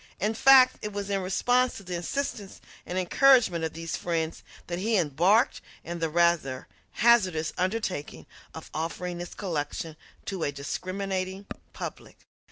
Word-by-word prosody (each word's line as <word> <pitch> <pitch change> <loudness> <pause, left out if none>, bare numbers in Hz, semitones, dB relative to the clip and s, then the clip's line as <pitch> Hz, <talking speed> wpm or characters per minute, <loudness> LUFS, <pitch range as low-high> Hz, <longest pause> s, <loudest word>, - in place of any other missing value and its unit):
In 210 +4 0
fact, 255 +2 +6
it 210 - -4
was 205 0 -4
in 195 -1 0
response 245 +7 +1
to 200 - -10
the 180 -1 -6
insistence 200 +2 -4 0.3
and 180 - -3
encouragement 185 -2 +4
of 160 - -2
these 165 0 -4
friends 165 -2 -2 0.2
that 175 0 -4
he 220 +3 +1
embarked 180 - +2 0.2
in 170 +1 -5
the 165 -1 0
rather 165 -6 +1 0.3
hazardous 190 -10 +3
undertaking 185 - -3 0.3
of - - -10
offering 175 +2 -4
this 175 - -7
collection 160 -3 -4 0.3
to 190 -3 -4
a 145 - 0
discriminating 185 +6 -4 0.3
public. - - -8
185 Hz, 145 wpm, -27 LUFS, 165-205 Hz, 0.3 s, fact